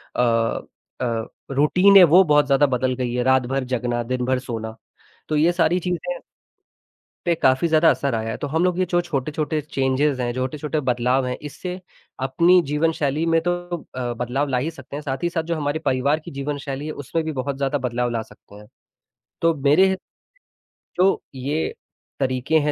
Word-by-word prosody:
अ 115 Hz, -2 st, +1 dB, 0.4 s
अ, 115 Hz, -3 st, -1 dB, 0.3 s
routine 180 Hz, +8 st, +5 dB
है, 185 Hz, -, +10 dB
वो 175 Hz, +3 st, +7 dB
बहुत 150 Hz, -3 st, +4 dB
ज़्यादा 140 Hz, +1 st, +4 dB
बदल 130 Hz, 0 st, 0 dB
गई 125 Hz, -2 st, -2 dB
है, 125 Hz, 0 st, 0 dB
रात-भर 130 Hz, +1 st, +2 dB
जगना, 120 Hz, -1 st, -2 dB
दिन-भर 125 Hz, +1 st, -1 dB
सोना। 115 Hz, -3 st, -6 dB, 0.5 s
तो 155 Hz, -, 0 dB
ये 160 Hz, +4 st, +4 dB
सारी 175 Hz, 0 st, +2 dB
चीज़ें 180 Hz, -, -3 dB, 1.1 s
पे 175 Hz, -, +3 dB
काफ़ी 130 Hz, +1 st, +2 dB
ज़्यादा 160 Hz, 0 st, +5 dB
असर 140 Hz, -4 st, -1 dB
आया 110 Hz, 0 st, -2 dB
है। -, -, -4 dB
तो 145 Hz, -, -4 dB
हम 160 Hz, +4 st, 0 dB
लोग 180 Hz, -1 st, +1 dB
ये 185 Hz, -, +2 dB
जो 175 Hz, -1 st, +2 dB
छोटे-छोटे 155 Hz, -1 st, -2 dB
चेंजेज़ 135 Hz, -1 st, 0 dB
हैं, 120 Hz, 0 st, -1 dB
ज -, -, -12 dB
छोटे-छोटे 150 Hz, +4 st, -2 dB
बदलाव 125 Hz, +2 st, +1 dB
हैं, 125 Hz, 0 st, -2 dB
इससे 180 Hz, +5 st, -6 dB, 0.5 s
अपनी 175 Hz, +6 st, +4 dB
जीवनशैली 155 Hz, -1 st, 0 dB
में 165 Hz, 0 st, +3 dB
तो -, -, +3 dB, 0.4 s
अ, 125 Hz, -1 st, -2 dB
बदलाव 125 Hz, +5 st, -2 dB
ला 125 Hz, -, +1 dB
ही 150 Hz, +6 st, -1 dB
सकते 155 Hz, -, -10 dB
हैं, 150 Hz, -, -4 dB
साथ 135 Hz, +1 st, -4 dB
ही 175 Hz, -, +2 dB
साथ 165 Hz, -2 st, -2 dB
जो 170 Hz, -, +1 dB
हमारी 145 Hz, 0 st, -2 dB
परिवार 140 Hz, +4 st, +1 dB
की -, -, -8 dB
जीवनशैली 140 Hz, 0 st, -4 dB
है, 155 Hz, -, -3 dB
उसमें 155 Hz, +3 st, -3 dB
भी 160 Hz, -, -2 dB
बहुत 135 Hz, 0 st, -3 dB
ज़्यादा 140 Hz, +1 st, 0 dB
बदलाव 125 Hz, -2 st, -1 dB
ला 115 Hz, -1 st, -2 dB
सकते 105 Hz, -1 st, -16 dB
हैं। 105 Hz, 0 st, -13 dB, 0.8 s
तो 165 Hz, 0 st, +4 dB
मेरे 190 Hz, +7 st, +5 dB, 1.0 s
तो 190 Hz, +2 st, +3 dB
ये 145 Hz, +5 st, -2 dB, 0.5 s
तरीके 130 Hz, +3 st, +1 dB
हैं 150 Hz, 0 st, 0 dB
140 Hz, 185 wpm, -22 LUFS, 125-160 Hz, 1.1 s, है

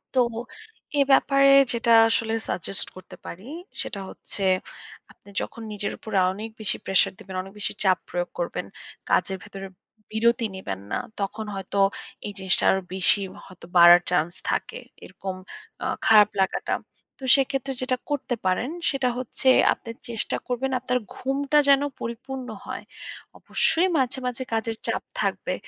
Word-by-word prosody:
তো, -, -, +4 dB, 0.8 s
এ -, -, +6 dB
ব্যাপারে 275 Hz, +1 st, +5 dB, 0.2 s
যেটা 235 Hz, 0 st, +1 dB, 0.2 s
আসলে 225 Hz, 0 st, 0 dB, 0.2 s
suggest 190 Hz, +2 st, +2 dB
করতে 185 Hz, -, -12 dB
পারি 190 Hz, +7 st, -9 dB, 0.3 s
সেটা 200 Hz, -, -3 dB
হচ্ছে, 200 Hz, -, -6 dB, 0.7 s
আপনি -, -, -20 dB
যখন 235 Hz, -4 st, -7 dB
নিজের 205 Hz, 0 st, -3 dB
উপর 220 Hz, -, -10 dB, 0.2 s
অনেক 215 Hz, +3 st, -6 dB
বেশি 210 Hz, -, +1 dB
প্রেশার 195 Hz, -, +3 dB
দিবেন, 190 Hz, 0 st, -9 dB
অনেক 195 Hz, +1 st, -12 dB
বেশি -, -, +1 dB
চাপ 185 Hz, -2 st, +4 dB
প্রয়োগ 175 Hz, 0 st, -2 dB
করবেন। -, -, -3 dB, 0.5 s
কাজের 190 Hz, 0 st, +2 dB
ভেতরে 195 Hz, 0 st, -8 dB, 0.4 s
বিরতি 235 Hz, +2 st, +2 dB
নিবেন 95 Hz, -, -5 dB
না। -, -, 0 dB, 0.2 s
তখন 215 Hz, +3 st, -3 dB
হয়তো 195 Hz, +1 st, -3 dB, 0.5 s
এই 205 Hz, -, -6 dB
জিনিসটা 190 Hz, 0 st, +4 dB
আরো 190 Hz, -, +1 dB
বেশি 190 Hz, +2 st, +5 dB, 0.2 s
হয়তো 185 Hz, -3 st, -14 dB
বাড়ার 175 Hz, +1 st, +9 dB
চান্স 175 Hz, -1 st, +1 dB, 0.2 s
থাকে। -, -, -3 dB, 0.3 s
এরকম 190 Hz, -1 st, -6 dB, 0.5 s
আ -, -, -2 dB, 0.2 s
খারাপ 210 Hz, -2 st, +7 dB
লাগাটা। 190 Hz, -, 0 dB, 0.5 s
তো -, -, -13 dB
সেক্ষেত্রে 270 Hz, 0 st, -1 dB
যেটা 255 Hz, 0 st, 0 dB
করতে 280 Hz, -4 st, -1 dB
পারেন 185 Hz, +8 st, +1 dB, 0.2 s
সেটা 270 Hz, -3 st, 0 dB
হচ্ছে, 255 Hz, +1 st, 0 dB, 0.2 s
আপনি 230 Hz, -, -13 dB, 0.2 s
চেষ্টা 225 Hz, -2 st, 0 dB
করবেন 255 Hz, +2 st, -1 dB
আপনার 250 Hz, 0 st, 0 dB, 0.2 s
ঘুমটা 275 Hz, +2 st, 0 dB
যেন 275 Hz, 0 st, +6 dB, 0.2 s
পরিপূর্ণ 250 Hz, +3 st, -6 dB, 0.2 s
হয়। -, -, -6 dB, 0.6 s
অবশ্যই 350 Hz, +3 st, +2 dB
মাঝে, 265 Hz, -1 st, 0 dB
মাঝে 250 Hz, +1 st, -3 dB
কাজের 225 Hz, 0 st, -1 dB
চাপ -, -, -1 dB, 0.2 s
থাকবে। -, -, -1 dB
225 Hz, 145 wpm, -25 LUFS, 190-260 Hz, 0.8 s, বাড়ার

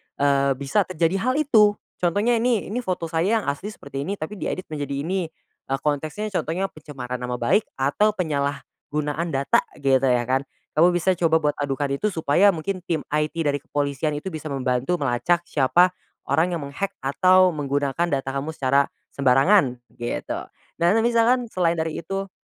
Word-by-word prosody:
eee, 140 Hz, -1 st, +2 dB
bisa 140 Hz, +9 st, 0 dB
terjadi 180 Hz, +1 st, 0 dB
hal 255 Hz, +5 st, 0 dB
itu 220 Hz, -9 st, +4 dB, 0.2 s
contohnya 205 Hz, +7 st, +2 dB
nih, 230 Hz, -4 st, 0 dB
"Ini 245 Hz, -, -1 dB
foto 180 Hz, -7 st, -3 dB
saya 200 Hz, +7 st, +1 dB
yang -, -, -8 dB
asli 165 Hz, +8 st, -7 dB
seperti 140 Hz, +2 st, -6 dB
ini 200 Hz, -, -1 dB
tapi 190 Hz, +3 st, -6 dB
diedit 185 Hz, -, -3 dB
menjadi 140 Hz, -1 st, -3 dB
ini," 180 Hz, 0 st, -1 dB, 0.4 s
eee, 135 Hz, 0 st, -1 dB
konteksnya 155 Hz, +9 st, -2 dB
contohnya 185 Hz, +2 st, -2 dB
pencemaran 130 Hz, -5 st, -7 dB
nama 125 Hz, 0 st, -3 dB
baik 120 Hz, -, +1 dB
atau 175 Hz, +11 st, +1 dB
penyalahgunaan 150 Hz, 0 st, -3 dB
data 135 Hz, +1 st, +3 dB, 0.2 s
gitu 135 Hz, -1 st, +4 dB
ya 125 Hz, -2 st, +2 dB
kan. 130 Hz, +3 st, -1 dB, 0.3 s
Kamu 175 Hz, +1 st, +5 dB
bisa 175 Hz, +2 st, +2 dB
coba 160 Hz, -3 st, +2 dB
buat 150 Hz, 0 st, 0 dB
adukan 140 Hz, 0 st, -1 dB
itu 140 Hz, +10 st, 0 dB
supaya 165 Hz, +1 st, +3 dB
mungkin 185 Hz, +4 st, -3 dB
tim 160 Hz, -3 st, -1 dB
IT 150 Hz, +1 st, 0 dB
dari 145 Hz, -1 st, 0 dB
kepolisian 145 Hz, 0 st, -2 dB
itu 180 Hz, +6 st, -5 dB
bisa 155 Hz, -1 st, -6 dB
membantu 135 Hz, +3 st, 0 dB
melacak 155 Hz, +5 st, +1 dB
siapa 175 Hz, +5 st, +3 dB, 0.3 s
orang 170 Hz, +3 st, +1 dB
yang 165 Hz, -, -2 dB
meng-hack 165 Hz, +8 st, -4 dB
atau 185 Hz, +7 st, +4 dB
menggunakan 145 Hz, +1 st, -1 dB
data 135 Hz, -3 st, -1 dB
kamu 140 Hz, +4 st, -3 dB
secara 140 Hz, -1 st, +2 dB, 0.2 s
sembarangan, 135 Hz, 0 st, +3 dB, 0.2 s
gitu. 120 Hz, 0 st, -3 dB, 0.4 s
Dan 185 Hz, +7 st, +3 dB
misalkan 235 Hz, +1 st, +2 dB
selain 175 Hz, -4 st, +1 dB
dari 160 Hz, -1 st, -2 dB
itu 195 Hz, +2 st, -4 dB
155 Hz, 165 wpm, -23 LUFS, 140-185 Hz, 0.4 s, Kamu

